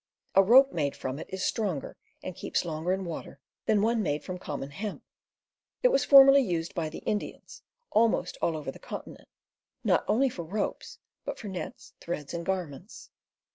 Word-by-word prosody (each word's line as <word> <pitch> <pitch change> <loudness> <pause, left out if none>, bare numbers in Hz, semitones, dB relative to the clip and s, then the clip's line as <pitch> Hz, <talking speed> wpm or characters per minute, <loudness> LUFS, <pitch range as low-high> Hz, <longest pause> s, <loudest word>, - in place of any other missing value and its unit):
A 195 - +7
rope 260 +7 +7
made 145 -4 -1
from 130 +2 -4
it - - -7
is 190 0 -3
stronger, 190 -11 -2 0.3
and 185 - -5
keeps - - -2
longer 160 +1 -2
in 190 0 -1
water, 160 -4 -7 0.3
than 210 -2 +3
one 230 0 +2
made 150 -6 -1
from 180 -1 -6
common 145 -4 -5
hemp. 205 +8 -5 0.8
It - - +7
was 275 - +2
formerly 275 0 +9
used 170 -8 -2
by 160 -3 -2
the 155 - -9
Indians, 210 - -4 0.3
almost 220 -5 +2
all 165 -2 +1
over 145 -3 -5
the - - -14
continent, - - -8 0.6
not - - +3
only 245 +6 +3
for 185 -9 -5
ropes, 200 +5 -3 0.3
but - - -4
for 210 - -7
nets, 185 -2 -7
threads, 150 -4 -5
and 170 0 -3
garments. 180 0 -5
185 Hz, 175 wpm, -28 LUFS, 160-215 Hz, 0.8 s, formerly